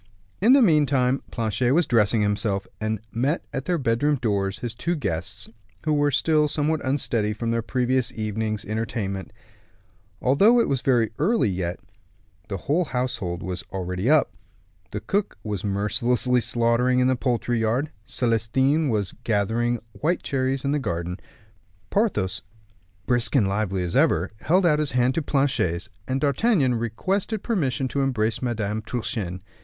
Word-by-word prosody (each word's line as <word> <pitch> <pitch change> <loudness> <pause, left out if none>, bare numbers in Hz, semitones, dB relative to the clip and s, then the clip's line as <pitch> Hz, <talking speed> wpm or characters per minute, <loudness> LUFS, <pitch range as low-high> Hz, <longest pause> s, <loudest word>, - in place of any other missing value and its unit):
In 230 +6 +6
the 275 -2 +6
meantime 140 - +3
Planchet 115 +2 0
was 170 0 +3
dressing 110 -2 +3
himself, 105 -1 0
and 110 -1 -2
met 135 +8 -1
at 135 - -3
their 175 +1 +1
bedroom 135 +2 +1
doors 100 -6 -1
his 120 -2 -5
two 170 +9 -2
guests, 95 - -4 0.4
who 155 -1 +1
were 145 0 +3
still 150 +2 +2
somewhat 150 0 0
unsteady 120 -6 0
from 115 +2 -2
their 115 0 0
previous 125 +1 0
evening's 110 -1 -3
entertainment. 105 -3 -3 0.9
Although 200 - +4
it - - +2
was 135 - 0
yet - - -15
very 120 -4 +3
early, 165 - +2 0.9
the 100 - -3
whole 165 +6 +1
household 125 - -3
was 90 0 -4
already 90 +4 -2
up. 155 -1 +4 0.6
The - - -5
cook 200 +1 -1
was 105 -4 -3
mercilessly 120 +5 +1
slaughtering 120 +2 +2
in 125 - +3
the 130 0 +3
poultry 120 -1 0
yard; 120 +7 0
Celestin 130 +7 +1
was 105 -5 -1
gathering 115 +3 +1
white 165 +9 -1
cherries 135 0 -1
in 140 - +1
the 150 - +1
garden. 90 -6 -3 0.7
Porthos, 105 - 0 0.6
brisk 120 +2 +2
and 110 -8 +4
lively 95 -2 -1
as 85 - -3
ever, 85 +4 +3
held 180 - +2
out 150 -3 +4
his 150 -2 -1
hand 125 +1 +3
to 165 - 0
Planchet's, 130 - 0 0.2
and 130 +1 0
D'Artagnan 140 - +2
requested 185 - -2
permission 140 - 0
to 140 - -1
embrace 115 -5 0
Madame 110 -4 -2
Truchen. 110 -5 -3
120 Hz, 150 wpm, -24 LUFS, 105-140 Hz, 0.9 s, In